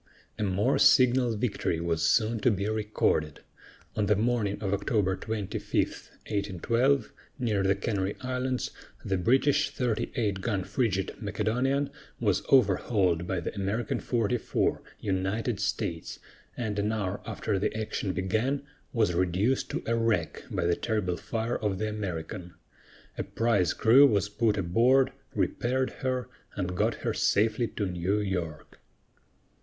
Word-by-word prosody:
A -, -, -2 dB
more 105 Hz, +7 st, +1 dB
signal 125 Hz, -3 st, +5 dB
victory 105 Hz, -7 st, -1 dB
was 85 Hz, -1 st, -1 dB
soon 110 Hz, +6 st, +2 dB
to 115 Hz, -, +3 dB
be 100 Hz, -2 st, 0 dB
recorded. 105 Hz, -8 st, 0 dB, 0.5 s
On 105 Hz, -1 st, +1 dB
the 105 Hz, -, +4 dB
morning 110 Hz, -2 st, 0 dB
of 100 Hz, -2 st, -1 dB
October 100 Hz, -2 st, +1 dB
25, 110 Hz, -2 st, -4 dB
1812, 115 Hz, +7 st, 0 dB, 0.2 s
near 110 Hz, -5 st, 0 dB
the 95 Hz, 0 st, +3 dB
Canary 100 Hz, -1 st, -2 dB
Islands, 130 Hz, 0 st, -2 dB, 0.3 s
the 95 Hz, -1 st, 0 dB
British 135 Hz, +9 st, +3 dB
38 110 Hz, -4 st, -1 dB
gun 100 Hz, -2 st, -1 dB
frigate, 100 Hz, -3 st, -1 dB
Macedonian, 125 Hz, +7 st, 0 dB, 0.3 s
was 105 Hz, -5 st, +2 dB
overhauled 95 Hz, -9 st, +3 dB
by 95 Hz, -, -1 dB
the -, -, -4 dB
American 100 Hz, +4 st, -1 dB
44, 115 Hz, -1 st, 0 dB, 0.2 s
United 100 Hz, +4 st, -1 dB
States, 100 Hz, -5 st, -2 dB, 0.4 s
and 110 Hz, -4 st, -2 dB
an 105 Hz, +2 st, +1 dB
hour 100 Hz, -3 st, -2 dB
after 105 Hz, -2 st, -2 dB
the 100 Hz, -, 0 dB
action 110 Hz, -2 st, -2 dB
began, 110 Hz, +10 st, 0 dB, 0.3 s
was 110 Hz, -7 st, +2 dB
reduced 95 Hz, +8 st, +1 dB
to -, -, -3 dB
a 115 Hz, -, 0 dB
wreck 115 Hz, -8 st, 0 dB
by -, -, -1 dB
the 85 Hz, 0 st, +3 dB
terrible 105 Hz, -5 st, -1 dB
fire 115 Hz, +5 st, -2 dB
of 105 Hz, -3 st, -1 dB
the 110 Hz, -, -1 dB
American. 90 Hz, -4 st, -5 dB, 0.6 s
A -, -, 0 dB
prize 115 Hz, -6 st, +1 dB
crew 130 Hz, +6 st, +7 dB
was 100 Hz, -5 st, +1 dB
put 110 Hz, 0 st, +1 dB
aboard, 120 Hz, +9 st, +3 dB, 0.2 s
repaired 130 Hz, +2 st, 0 dB
her, 130 Hz, -1 st, -1 dB, 0.3 s
and 90 Hz, -2 st, -2 dB
got -, -, +1 dB
her -, -, +1 dB
safely 110 Hz, +3 st, +2 dB
to 105 Hz, -, -3 dB
New 90 Hz, +3 st, 0 dB
York. 90 Hz, -6 st, -4 dB
105 Hz, 140 wpm, -28 LUFS, 95-120 Hz, 0.6 s, crew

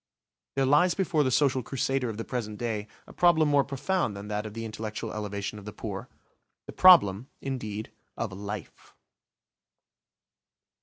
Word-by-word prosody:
There 135 Hz, 0 st, +2 dB
lies 170 Hz, +7 st, +4 dB
before 175 Hz, -6 st, +1 dB
the 130 Hz, -, +1 dB
social 130 Hz, 0 st, +2 dB
crusader 135 Hz, 0 st, -1 dB
of 110 Hz, -, -5 dB
the 115 Hz, -, -4 dB
present 110 Hz, -4 st, -4 dB
day 110 Hz, -3 st, -3 dB, 0.2 s
a -, -, -14 dB
problem 170 Hz, -3 st, +4 dB
more 145 Hz, -1 st, +4 dB
profound 140 Hz, -, -1 dB
than 100 Hz, +1 st, -8 dB
that 105 Hz, +1 st, -2 dB
of 105 Hz, -, -10 dB
the 115 Hz, 0 st, -4 dB
intellectual 110 Hz, -1 st, -5 dB
elevation 105 Hz, 0 st, -4 dB
of 100 Hz, -, -13 dB
the 105 Hz, -, -6 dB
poor; -, -, -6 dB, 0.6 s
the -, -, -9 dB
problem, 130 Hz, -, +6 dB
indeed, 110 Hz, -5 st, -5 dB, 0.3 s
of 110 Hz, -5 st, -3 dB
life. 100 Hz, 0 st, -8 dB
115 Hz, 155 wpm, -28 LUFS, 105-140 Hz, 0.6 s, problem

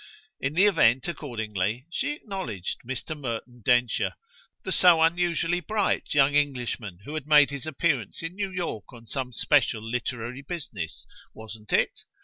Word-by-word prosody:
In 135 Hz, +3 st, -2 dB
the 190 Hz, +4 st, +6 dB
event, 130 Hz, -, +4 dB
accordingly, 110 Hz, -, -3 dB
she 285 Hz, +11 st, -1 dB
acknowledged 190 Hz, -, -5 dB
Mr. 130 Hz, +5 st, -4 dB
Merton 120 Hz, -3 st, -5 dB
Densher, 120 Hz, 0 st, +2 dB, 0.5 s
the 190 Hz, -, -4 dB
so 180 Hz, -3 st, +6 dB
unusually 170 Hz, 0 st, +2 dB
"bright" 205 Hz, -4 st, -1 dB
young 140 Hz, 0 st, +5 dB
Englishman 125 Hz, -9 st, -1 dB
who 150 Hz, -, -7 dB
had 155 Hz, -2 st, -4 dB
made 150 Hz, -2 st, +6 dB
his 140 Hz, +1 st, -5 dB
appearance 150 Hz, -4 st, -1 dB
in 165 Hz, +1 st, -4 dB
New 195 Hz, 0 st, -2 dB
York 175 Hz, -, -4 dB
on 115 Hz, -1 st, -13 dB
some 130 Hz, +2 st, -3 dB
special 120 Hz, -3 st, +2 dB
literary 120 Hz, +2 st, -3 dB
business 135 Hz, -, -6 dB, 0.3 s
wasn't 110 Hz, -1 st, -10 dB
it? -, -, +2 dB
135 Hz, 145 wpm, -27 LUFS, 115-170 Hz, 0.5 s, the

